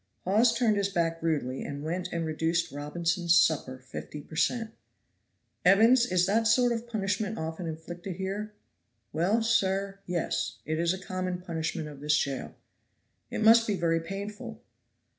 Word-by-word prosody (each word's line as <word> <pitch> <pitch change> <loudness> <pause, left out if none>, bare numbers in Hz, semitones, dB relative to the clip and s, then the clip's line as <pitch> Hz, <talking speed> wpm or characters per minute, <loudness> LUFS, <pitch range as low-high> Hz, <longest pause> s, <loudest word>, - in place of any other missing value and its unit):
Hawes 215 +6 +4
turned 225 -4 +2
his 200 -1 +1
back 165 -3 -1
rudely 145 -6 -1
and 145 0 -6
went 175 +3 -2
and 165 -1 -2
reduced 165 +2 0
Robinson's 170 +4 +1
supper 135 -4 +1
fifty 130 +3 -8
per 155 - -11
cent. 225 +6 0 0.9
"Evans, 225 +7 +6
is 180 -3 +2
that 220 +4 +2
sort 245 +2 +4
of 235 0 -3
punishment 210 0 -1
often 160 +2 -4
inflicted 175 +3 -6
here?" 195 +3 -4 0.6
"Well, 195 +8 +2
sir, 195 -3 +1
yes. 175 -2 -2
It 155 +1 -2
is 170 0 +2
a 185 - -2
common 185 -1 -3
punishment 160 -2 -3
of 145 -2 -10
this 150 +1 +2
jail." 140 -2 -3 0.7
"It - - -2
must 230 +1 +7
be 210 - +1
very 165 -2 +1
painful." 205 +7 -7
180 Hz, 155 wpm, -28 LUFS, 160-210 Hz, 0.9 s, must